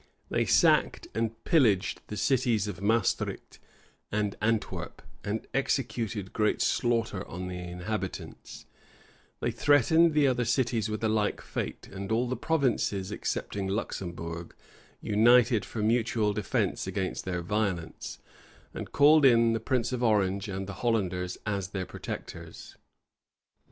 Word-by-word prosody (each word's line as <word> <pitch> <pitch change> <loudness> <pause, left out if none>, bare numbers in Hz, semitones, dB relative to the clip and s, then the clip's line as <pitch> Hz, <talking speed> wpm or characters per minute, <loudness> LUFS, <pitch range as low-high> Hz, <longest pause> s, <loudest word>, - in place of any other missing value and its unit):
They - - +1
sacked - - +3
and 115 0 -2
pillaged 115 - +2
the 105 - -6
cities 120 -5 +1
of 95 -3 -6
Maestricht 110 0 0 0.5
and 105 -1 -1
Antwerp, 110 -1 -2 0.2
and 105 +2 -3
executed 120 -7 -1
great 105 -1 +1
slaughter 115 -5 0
on 90 +2 -6
the 90 0 -5
inhabitants: 90 +3 -6 0.8
they - - 0
threatened 155 +3 +4
the 150 -1 +5
other 125 -2 +2
cities 120 -2 0
with 110 +1 -4
a - - +3
like 110 -1 0
fate: - - -5
and 100 +1 -6
all 120 +3 +2
the 130 - -1
provinces, 120 -9 0
excepting 100 -1 -3
Luxembourg, 85 -4 -4 0.5
united 115 +1 +4
for 110 - -4
mutual 110 -2 +1
defence 105 -2 -1
against 95 -2 -3
their 90 -2 -3
violence, 95 -3 -2 0.6
and - - -7
called 150 +2 +6
in 115 -3 +5
the 115 - 0
prince 120 +1 0
of 125 -1 -2
Orange 100 -3 +2
and 95 0 -4
the 100 - -6
Hollanders 90 -6 0
as 100 -3 -2
their 95 -1 -4
protectors. - - -8
110 Hz, 130 wpm, -28 LUFS, 95-120 Hz, 0.8 s, called